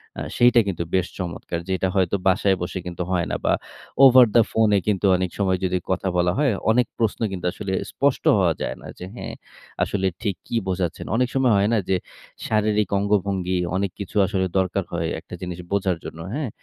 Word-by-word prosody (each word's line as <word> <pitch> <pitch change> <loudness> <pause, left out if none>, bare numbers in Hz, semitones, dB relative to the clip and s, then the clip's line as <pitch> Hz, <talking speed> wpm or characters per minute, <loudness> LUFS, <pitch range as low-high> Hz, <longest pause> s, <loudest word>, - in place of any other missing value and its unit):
অ্যাঁ - - -5
সেইটা 120 0 +6
কিন্তু 85 -3 -2
বেশ 90 -1 +1
চমৎকার। 85 -1 -4
যেটা 95 0 0
হয়তো 95 0 +2
বাসায় 95 0 +3
বসে 90 +1 -3
কিন্তু 90 0 -4
হয় 90 -2 +1
না - - 0
বা - - +3 0.5
over 130 -1 +9
the 115 - +8
phone 110 -2 +3
এ - - +3
কিন্তু 100 -1 +1
অনেক 95 0 -1
সময় 95 -2 +1
যদি 90 0 0
কথা 95 +1 -1
বলা 90 0 +3
হয়, 145 -4 +3 0.2
অনেক 120 0 +3
প্রশ্ন 115 -3 0
কিন্তু 90 -2 -5
আসলে 95 -1 -5 0.2
স্পষ্ট 140 -1 0
হওয়া 90 -4 +3
যায় - - -2
না - - -10
যে, 90 - -6
"হ্যাঁ, - - -6 0.5
আসলে 95 -2 0
ঠিক 100 -5 -1
কি - - -4
বোঝাচ্ছেন।" 90 -3 -2
অনেক 125 +1 +2
সময় 130 -4 +3
হয় 100 +2 +2
না - - +3
যে 95 - +3 0.5
শারীরিক 105 -1 +1
অঙ্গভঙ্গি, 100 -2 0 0.2
অনেক 95 -1 0
কিছু 100 - -7
আসলে 95 -1 0
দরকার 95 +1 0
হয় 85 -1 -1
একটা 90 - -14
জিনিস 90 -1 -5
বোঝার 95 -3 +1
জন্য, 80 - -8
হ্যাঁ? 145 -2 -2
95 Hz, 200 wpm, -23 LUFS, 90-105 Hz, 0.5 s, over